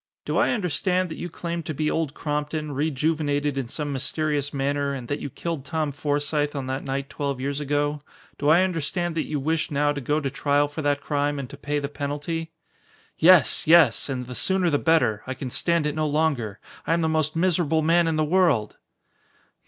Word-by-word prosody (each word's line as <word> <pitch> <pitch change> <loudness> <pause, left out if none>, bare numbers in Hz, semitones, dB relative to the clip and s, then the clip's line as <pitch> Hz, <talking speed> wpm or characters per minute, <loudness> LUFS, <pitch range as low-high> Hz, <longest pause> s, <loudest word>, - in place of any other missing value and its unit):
"Do - - -2
I - - +3
understand 185 -3 0
that 160 - -7
you 175 - -4
claim 170 +1 -4
to 155 -1 -5
be 150 +2 0
Old 160 -3 -1
Crompton, 150 0 -3
rejuvenated 145 0 0
in 135 -3 -2
some 145 +3 -4
mysterious 145 +1 -1
manner, 140 0 -1
and 130 -3 -6
that 145 - -1
you 140 - -5
killed 165 +1 -4
Tom 155 +1 -2
Forsythe 145 +1 -1
on 135 -2 -3
that 130 +1 -3
night 135 0 -3
twelve 140 -3 -3
years 140 +2 -2
ago? 145 0 -1 0.4
Do 145 - +1
I 170 +4 +6
understand 175 -1 -1
that 160 - -2
you 150 -1 -2
wish 160 +3 -1
now 145 0 +1
to 145 -1 -4
go 145 +4 0
to 140 -3 -3
trial 145 +1 +2
for 145 +2 -6
that 145 -1 +1
crime 145 0 -1
and 135 -2 -4
to - - -8
pay 145 +1 -3
the 140 -1 -2
penalty?" 150 +3 -4 0.7
"Yes! 175 -3 +5
Yes! 160 -7 +5
And 125 -2 -3
the 125 - -7
sooner 185 +5 +1
the 145 - +2
better. 125 -11 +2
I 130 - -3
can 130 -2 -6
stand 170 +1 +1
it 150 - 0
no 155 0 0
longer. 145 -9 0 0.3
I - - +3
am 170 - +1
the 160 - +1
most 155 -1 0
miserable 165 -2 +2
man 165 +1 +4
in 165 - +1
the 155 0 +1
world!" 155 - +2
150 Hz, 205 wpm, -24 LUFS, 140-160 Hz, 0.7 s, I